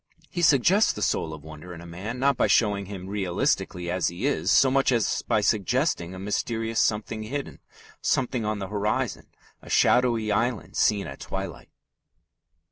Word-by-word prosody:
He 175 - -3
suggests 170 - +4
the 105 - -4
soul 80 - 0
of 80 -2 -9
wonder 80 +3 -10
in - - -10
a 85 - -11
man 95 +8 -6
not 140 +1 +2
by - - +2
showing 100 -4 +2
him 95 -2 -7
realistically 90 -2 -1
as 90 0 0
he 90 +8 -3
is 145 - 0
so 130 - +5
much 135 0 +3
as 115 -4 +1
by 105 - +1
suggesting 105 - 0
a - - -8
mysterious 110 +3 -1
something 110 0 -1
hidden, 140 +6 -5 0.4
something 125 -2 0
on 105 0 -1
the 95 -2 -5
horizon, 105 +1 -2 0.3
a - - -13
shadowy 120 -3 +3
island 120 -2 -1
seen 105 -2 +2
at 70 - -8
twilight. 95 -7 -6
105 Hz, 170 wpm, -26 LUFS, 95-125 Hz, 0.4 s, so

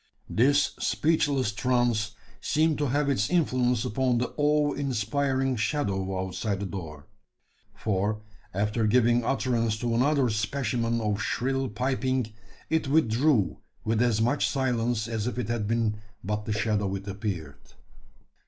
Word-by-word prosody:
This 145 +6 +3
speechless 145 -7 +1
trance 115 -2 +1 0.3
seemed 155 0 +1
to 145 - +1
have 145 +3 +1
its 120 -7 +1
influence 125 -8 +2
upon 125 +1 +1
the 120 0 -2
awe 150 0 +2
inspiring 135 +1 0
shadow 95 -7 -1
outside 95 +2 -2
the 100 - -3
door: 80 -6 -7 0.7
for, 105 +1 -1 0.3
after 105 +3 0
giving 120 +1 +3
utterance 115 -3 0
to 120 +1 -1
another 130 0 +2
specimen 115 0 -1
of 105 -2 -1
shrill 135 +5 -1
piping, 130 0 -1 0.3
it 160 -3 0
withdrew 135 - +2 0.3
with 110 +1 +1
as 120 -3 +2
much 125 +6 +2
silence 120 -4 0
as 110 -1 -2
if 125 - -3
it 125 -3 -2
had 115 -3 -1
been 115 -1 0 0.3
but 105 +2 -2
the - - -3
shadow 105 -2 0
it 100 +1 -7
appeared! 95 -8 -5
120 Hz, 135 wpm, -27 LUFS, 105-135 Hz, 0.7 s, This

